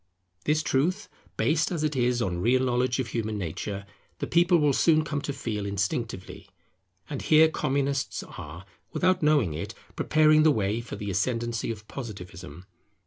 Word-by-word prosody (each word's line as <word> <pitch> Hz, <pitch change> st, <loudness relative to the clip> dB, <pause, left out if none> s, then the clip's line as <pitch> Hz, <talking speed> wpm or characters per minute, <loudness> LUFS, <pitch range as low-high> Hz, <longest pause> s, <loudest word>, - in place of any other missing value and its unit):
This 155 Hz, +1 st, +2 dB
truth, 180 Hz, +11 st, 0 dB, 0.3 s
based 155 Hz, +3 st, +2 dB
as 165 Hz, -4 st, -2 dB
it 155 Hz, -1 st, 0 dB
is 125 Hz, -1 st, +1 dB
on 90 Hz, -4 st, -2 dB
real 130 Hz, +5 st, +3 dB
knowledge 125 Hz, 0 st, +1 dB
of 130 Hz, -3 st, -2 dB
human 110 Hz, -2 st, -2 dB
nature, 100 Hz, +2 st, -4 dB, 0.3 s
the -, -, -3 dB
people 175 Hz, +1 st, +4 dB
will 150 Hz, -3 st, +3 dB
soon 155 Hz, +2 st, +4 dB
come 150 Hz, -2 st, -3 dB
to 140 Hz, -, -3 dB
feel 115 Hz, -6 st, -4 dB
instinctively. 100 Hz, +1 st, -3 dB, 0.6 s
And 140 Hz, -, -5 dB
here 155 Hz, +1 st, +6 dB
Communists 140 Hz, -3 st, -1 dB
are, 85 Hz, +5 st, -9 dB, 0.3 s
without 185 Hz, 0 st, +2 dB
knowing 145 Hz, -, +3 dB
it, 80 Hz, -, -5 dB, 0.2 s
preparing 155 Hz, 0 st, +4 dB
the 155 Hz, -, +6 dB
way 110 Hz, -4 st, +1 dB
for 120 Hz, -, -7 dB
the 100 Hz, -1 st, -4 dB
ascendancy 115 Hz, +3 st, -1 dB
of 105 Hz, -2 st, -6 dB
Positivism. 90 Hz, -, -8 dB
125 Hz, 160 wpm, -27 LUFS, 105-155 Hz, 0.6 s, here